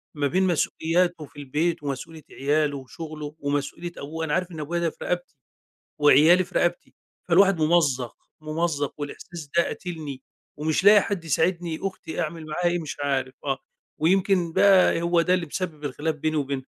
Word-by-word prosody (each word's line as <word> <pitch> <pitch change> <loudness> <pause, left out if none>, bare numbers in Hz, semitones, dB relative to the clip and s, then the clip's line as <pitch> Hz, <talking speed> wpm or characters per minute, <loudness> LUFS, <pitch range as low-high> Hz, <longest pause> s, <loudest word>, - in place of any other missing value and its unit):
ما 145 -1 +1
بين 185 +5 +1
مسؤولياتُه 170 0 0
في 145 +1 -15
البيت 150 +4 -1
ومسؤولية 150 +3 -5
عيالُه 145 +1 0
وشغلُه، 150 +2 -8
ومسؤولية 145 +4 -3
أبوه؟ 160 +3 -4
أنا 150 - -2
عارف 180 -1 0
إن 160 - -8
أبويا 170 +4 -2
ده 170 -1 +1
في - - -17
رقبتي 175 -2 -3 0.7
وعيالي 160 +5 +6
في - - -19
رقبتي، 175 0 -1 0.3
فالواحد 190 0 +5
ممزّق، 145 -7 +2 0.2
ممزّق 155 -2 -1
والإحساس 150 +2 -7
ده - - +7
قاتلني، 155 -7 -6 0.4
ومش 155 +4 0
لاقي 205 0 +8
حد 190 -5 -3
يساعدني، 165 +1 0
أختي 185 -4 -4
أعمل 160 0 -5
معاها 175 +3 -2
إيه 175 0 -1
مش 150 - -6
عارف، 135 -2 -1
آه 135 -2 -1 0.4
ويمكن 180 0 +2
بقى 190 -3 +5
هو 170 0 +3
ده 180 +2 +2
اللي 175 -3 -1
مسبِّب 155 -2 -5
الخلاف 150 +3 -2
بيني 155 +1 -1
وبينها. 140 -2 -2
160 Hz, 165 wpm, -25 LUFS, 145-175 Hz, 0.7 s, لاقي